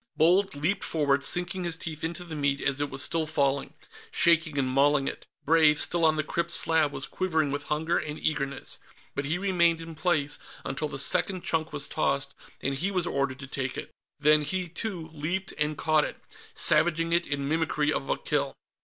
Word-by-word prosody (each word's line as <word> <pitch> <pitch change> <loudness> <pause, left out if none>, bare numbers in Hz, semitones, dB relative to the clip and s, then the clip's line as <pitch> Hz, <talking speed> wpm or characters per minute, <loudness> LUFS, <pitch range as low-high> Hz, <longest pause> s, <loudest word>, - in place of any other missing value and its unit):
Bold 180 +4 +4
leaped 175 +8 -1
forward, 140 -3 +1
sinking 175 +3 0
his 170 -2 0
teeth 160 -2 -6
into 170 +2 -3
the 170 -2 -9
meat 140 -1 0
as 140 0 0
it 145 - -1
was 135 0 -1
still 160 +3 0
falling, 140 -3 0 0.3
shaking 160 -3 +3
and 135 -2 +1
mauling 140 +2 +3
it. - - -6 0.2
Brave, 155 -1 +5
still 170 -1 +1
on 155 -1 +4
the 155 - 0
crypt 170 +3 -2
slab, 160 -3 +3
was 135 - -2
quivering 160 -6 0
with 145 +1 -3
hunger 160 +3 0
and 150 0 -5
eagerness, 140 -3 -2 0.3
but 140 - -3
he 155 +5 0
remained 175 -3 +2
in 165 0 -8
place 155 -3 +1 0.3
until 135 +3 -2
the - - -6
second 180 +5 +1
chunk 160 -1 -1
was 145 -1 -2
tossed 140 -1 -1 0.3
and 135 - 0
he 160 +9 -1
was 180 -3 0
ordered 140 -4 -1
to - - -6
take 135 -1 -3
it. - - -6 0.3
Then 150 +1 +5
he, 180 +5 -2
too, 170 -2 -5
leaped 170 +5 -3
and 150 0 0
caught 155 0 +3
it, - - -5 0.4
savaging 165 0 +2
it 170 0 +2
in 140 -1 -2
mimicry 155 -1 +1
of 135 - -3
a - - +1
kill. 140 -2 -1
155 Hz, 200 wpm, -27 LUFS, 145-170 Hz, 0.4 s, Brave